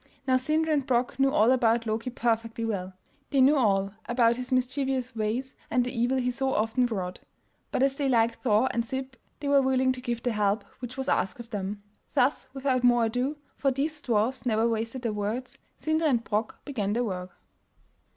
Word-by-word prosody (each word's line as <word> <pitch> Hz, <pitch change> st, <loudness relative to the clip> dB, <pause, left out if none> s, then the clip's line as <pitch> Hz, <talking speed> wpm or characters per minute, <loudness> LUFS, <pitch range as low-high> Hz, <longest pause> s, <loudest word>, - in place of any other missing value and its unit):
Now 260 Hz, -, +4 dB
Sindri 310 Hz, +4 st, +1 dB
and 285 Hz, -2 st, +2 dB
Brok 250 Hz, -1 st, 0 dB
knew 270 Hz, 0 st, +5 dB
all 225 Hz, -1 st, +4 dB
about 235 Hz, -2 st, +3 dB
Loki 225 Hz, +3 st, -2 dB
perfectly 230 Hz, -1 st, -1 dB
well; 190 Hz, -4 st, -3 dB, 0.4 s
they 275 Hz, -, +1 dB
knew 270 Hz, +3 st, +6 dB
all 200 Hz, -6 st, +2 dB
about 235 Hz, -1 st, +3 dB
his 255 Hz, 0 st, -6 dB
mischievous 260 Hz, 0 st, 0 dB
ways 225 Hz, +5 st, -2 dB, 0.2 s
and 250 Hz, -1 st, +2 dB
the 250 Hz, -, -5 dB
evil 240 Hz, +3 st, +1 dB
he 250 Hz, -1 st, +1 dB
so 265 Hz, +1 st, 0 dB
often 225 Hz, +4 st, +2 dB
wrought, 185 Hz, -6 st, -4 dB, 0.5 s
but -, -, +1 dB
as 270 Hz, 0 st, +2 dB
they 275 Hz, -1 st, 0 dB
liked 230 Hz, -2 st, +2 dB
Thor 225 Hz, +1 st, +3 dB
and 235 Hz, -, 0 dB
Sib 260 Hz, +2 st, -5 dB, 0.3 s
they 290 Hz, -, -3 dB
were 280 Hz, -1 st, +5 dB
willing 260 Hz, 0 st, +2 dB
to 255 Hz, -1 st, -5 dB
give 240 Hz, -2 st, -3 dB
the 245 Hz, -, +1 dB
help 205 Hz, 0 st, +1 dB, 0.2 s
which 250 Hz, 0 st, -7 dB
was 265 Hz, -, -3 dB
asked 195 Hz, -, 0 dB
of 235 Hz, 0 st, -10 dB
them. 205 Hz, 0 st, -4 dB, 0.3 s
Thus 260 Hz, +4 st, +2 dB
without 265 Hz, -2 st, 0 dB
more 240 Hz, -1 st, +5 dB
ado, 250 Hz, +6 st, -1 dB, 0.2 s
for 275 Hz, -, +1 dB
these 295 Hz, +3 st, -2 dB
dwarfs 235 Hz, +1 st, 0 dB
never 225 Hz, -2 st, +2 dB
wasted 230 Hz, +2 st, -2 dB
their 230 Hz, -3 st, -1 dB
words, 210 Hz, +5 st, -4 dB, 0.2 s
Sindri 315 Hz, +1 st, +1 dB
and 240 Hz, -5 st, +2 dB
Brok 215 Hz, 0 st, -3 dB
began 210 Hz, -8 st, -2 dB
their 240 Hz, +2 st, +1 dB
work. 185 Hz, -4 st, -5 dB
245 Hz, 200 wpm, -27 LUFS, 225-265 Hz, 0.5 s, knew